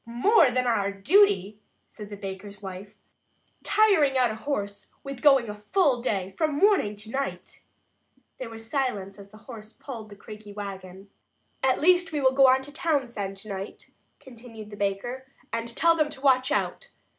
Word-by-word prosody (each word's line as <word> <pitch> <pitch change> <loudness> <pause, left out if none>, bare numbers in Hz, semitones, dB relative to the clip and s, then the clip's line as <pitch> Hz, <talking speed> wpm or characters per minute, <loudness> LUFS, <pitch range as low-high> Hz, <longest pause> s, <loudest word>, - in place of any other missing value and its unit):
"More 280 - +4
than 250 0 0
our 205 -5 +1
duty," 215 - +3 0.3
said 210 -2 -11
the 205 - -8
baker's 195 +1 -8
wife, 195 0 -9 0.7
"tiring 335 -11 +3
out 250 -3 +3
a - - -5
horse 205 -5 -4 0.2
with 275 -2 -7
going 270 -5 +5
a 210 - -5
full 245 - +1
day, 195 -6 -2
from 310 -2 +1
morning 400 - +4
until 210 +1 -11
night!" 275 +2 -5 0.8
There 255 - -6
was 225 0 -10
silence 210 -7 -2
as 200 0 -12
the 215 - -15
horse 220 -3 -11
pulled 230 -6 -9
the 205 - -11
creaky 210 0 -11
wagon. 195 -1 -8 0.5
"At 265 -1 +2
least 355 +1 +3
we 300 - -1
will 260 -1 +3
go 270 0 +6
on 260 +1 +4
to 290 +1 -8
Townsend 240 - -2
tonight," 195 -1 -8 0.3
continued 230 -4 -12
the - - -8
baker, 205 +6 -3 0.3
"and 230 0 -2
tell 330 +8 +3
them 305 -2 +1
to 280 -3 -10
watch 255 -2 +3
out. - - -2
235 Hz, 170 wpm, -26 LUFS, 205-275 Hz, 0.8 s, go